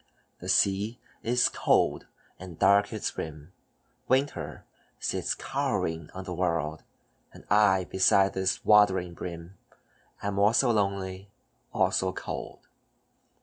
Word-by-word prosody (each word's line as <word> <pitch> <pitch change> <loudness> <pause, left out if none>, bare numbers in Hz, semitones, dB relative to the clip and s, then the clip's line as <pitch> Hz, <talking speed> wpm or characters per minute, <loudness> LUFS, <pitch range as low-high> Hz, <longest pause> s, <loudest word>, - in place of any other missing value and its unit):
"The - - -7
sea 100 +4 +2 0.2
is 125 +2 +2
cold, - - +1 0.3
and 90 -3 -10
dark 100 +1 +4
its 110 -2 -4
rim, 80 +2 -7 0.5
Winter 135 +2 -1 0.3
sits - - -1
cowering 80 -1 -2
on 95 - -6
the 90 -1 -6
world, 85 -4 -1 0.5
And - - -15
I, 100 -3 +4
besides 95 +1 +3
this 95 0 -1
watery 95 -4 +4
brim, 85 +1 -8 0.6
Am 100 -1 -2
also 115 +5 +4
lonely, 100 -2 -2 0.4
also 95 0 +1
cold." - - -7
95 Hz, 110 wpm, -28 LUFS, 90-105 Hz, 0.6 s, dark